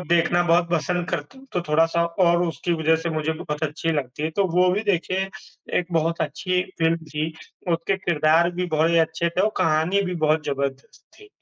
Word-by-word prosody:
देखना 175 0 +2
बहुत 170 0 +3
पसंद 175 +1 -1
करता 145 - -4
हूँ, 270 - -16
तो 180 - 0
थोड़ा-सा 165 +2 +3 0.2
और 170 +1 +3
उसकी 170 +1 -2
वज़ह 160 0 +2
से 170 - -2
मुझे 155 0 -1
बहुत 150 -1 -5
अच्छी 155 +2 -2
लगती 140 -1 -3
है। 155 - -1
तो 200 - +3
वो 180 0 +5
भी 200 - 0
देखिए 190 0 0 0.5
एक 180 - -2
बहुत 165 +1 0
अच्छी 180 +5 -1 0.2
फ़िल्म 165 0 +2
थी, 155 +1 -3 0.4
उसके 170 +3 0
किरदार 170 -1 +2
भी 180 +1 -2
बहुत 160 +2 +3
ही 170 - +4
अच्छे 165 +1 +1
थे 175 +2 -2
और 215 - +3
कहानी 165 +3 +2
भी 180 - -3
बहुत 155 0 +2
ज़बरदस्त 140 -1 -4 0.2
थी। 415 - -15
165 Hz, 200 wpm, -23 LUFS, 155-180 Hz, 0.5 s, वो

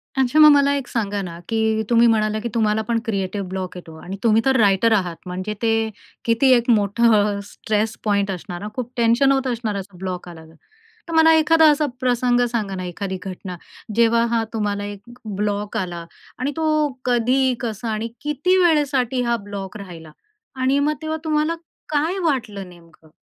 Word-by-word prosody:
अच्छा 265 +3 +2
मग 305 0 +10
मला 280 0 +4
एक 275 -3 -4
सांगा 205 -3 -2
ना, 170 -2 -7
की 220 -1 +1
तुम्ही 235 0 +5
म्हणाला, 215 -1 +1
की 235 +2 -4
तुम्हाला 220 -1 +1
पण 230 +1 -1
क्रिएटिव्ह 195 -2 -2
ब्लॉक 185 -1 -5
येतो. 160 -2 -11
आणि 195 +2 -6
तुम्ही 225 0 +4
तर 265 0 +3
रायटर 205 +2 +4
आहात. 180 -5 0
म्हणजे, 185 +4 -4
ते 225 -1 +1 0.4
किती 235 +3 +3
एक 240 0 +2
मोठं 210 -1 +3
स्ट्रेस 215 +1 -2
पॉइंट 200 -2 +1
असणार 180 0 -6
ना? 210 - -5
खूप 250 -1 -4
टेन्शन 235 +4 +4
होत 270 -1 +1
असणार, 230 -4 -2
असं 190 -2 -8
ब्लॉक 180 -1 -5
आला 160 -2 -12
तर. 160 +1 -18 0.5
तर 330 - -6
मला 320 0 +6
एखादा 320 0 +5
असा 295 +1 +1
प्रसंग 245 -1 +2
सांगा 205 -5 -2
ना, 185 - -5
एखादी 190 +2 -4
घटना, 185 -1 -7 0.4
जेव्हा 230 0 +4
हा 230 -1 +1
तुम्हाला 205 -2 -2
एक 205 -1 -7 0.3
ब्लॉक 205 0 -2
आला 175 -2 -4 0.3
आणि 265 +3 -1
तो 310 -1 +2 0.2
कधी, 250 +2 +2
कसा 225 -1 -4
आणि 215 +2 -2
किती 300 +6 +1
वेळेसाठी 275 -6 +2
हा 235 0 +1
ब्लॉक 200 0 -7
राहिला 170 -5 -10 0.4
आणि 265 +2 +1
मग 300 +2 +1
तेव्हा 315 0 -3
तुम्हाला 310 +1 +1 0.3
काय 315 +5 0
वाटलं 215 - -2
नेमकं? 165 -2 -19
225 Hz, 180 wpm, -21 LUFS, 200-260 Hz, 0.5 s, मग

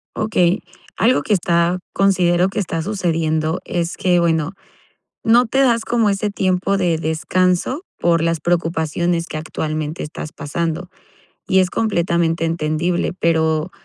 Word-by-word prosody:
Okey, 190 -3 +1 0.3
algo 245 +3 +2
que 215 - +1
está 175 -1 +1
considero 185 -2 +2
que 205 - -3
está 165 -4 -2
sucediendo 160 -4 -1
es 170 0 -2
que 180 -1 +2
bueno, 165 -2 +1 0.7
no 235 +2 +5
te 265 +4 -1
das 235 -4 +3
como 230 -3 +2
ese 200 +1 -1
tiempo 190 0 0
de 175 -4 +1
descanso 180 - 0
por 170 -1 +2
las 165 -1 0
preocupaciones 170 0 0
que, - - -5
actualmente, 155 0 -4
estás 150 +1 -7
pasando 170 +4 -3 0.6
y 190 - +4
es 185 -1 +2
completamente 170 -5 0
entendible. 165 +2 -1
Pero 160 -1 +1
175 Hz, 135 wpm, -19 LUFS, 160-190 Hz, 0.7 s, no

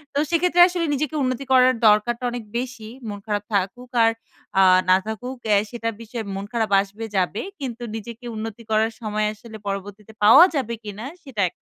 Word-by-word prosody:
তো - - +2
সেক্ষেত্রে 350 +1 +3
আসলে 350 -2 -2
নিজেকে 295 +1 -2
উন্নতি 255 +1 -2
করার 255 0 +6
দরকারটা 225 +3 +3
অনেক 240 -1 -5
বেশি। 245 -3 -5 0.2
মন 205 -1 -6
খারাপ 205 -2 -2
থাকুক 225 +6 -1
আর 225 - +5 0.5
আ - - +7 0.3
না 185 - +7
থাকুক 250 +4 -5
অ্যা 210 -1 +4
সেটার 230 -1 -3
বিষয়ে 230 0 -6
মন 195 +1 -4
খারাপ 220 -3 0
আসবে 200 +3 -7
যাবে। 185 +2 0 0.2
কিন্তু 245 -4 -5
নিজেকে 230 +2 -8
উন্নতি 220 +1 -6
করার 220 +1 +2
সময় 215 -1 -1
আসলে 220 +1 -11
পরবর্তীতে 200 +2 -6
পাওয়া 250 +11 +9
যাবে 255 -5 -1
কিনা? 210 +2 -7 0.2
সেটা 260 -8 -4
একটা - - -34
225 Hz, 180 wpm, -23 LUFS, 210-250 Hz, 0.5 s, পাওয়া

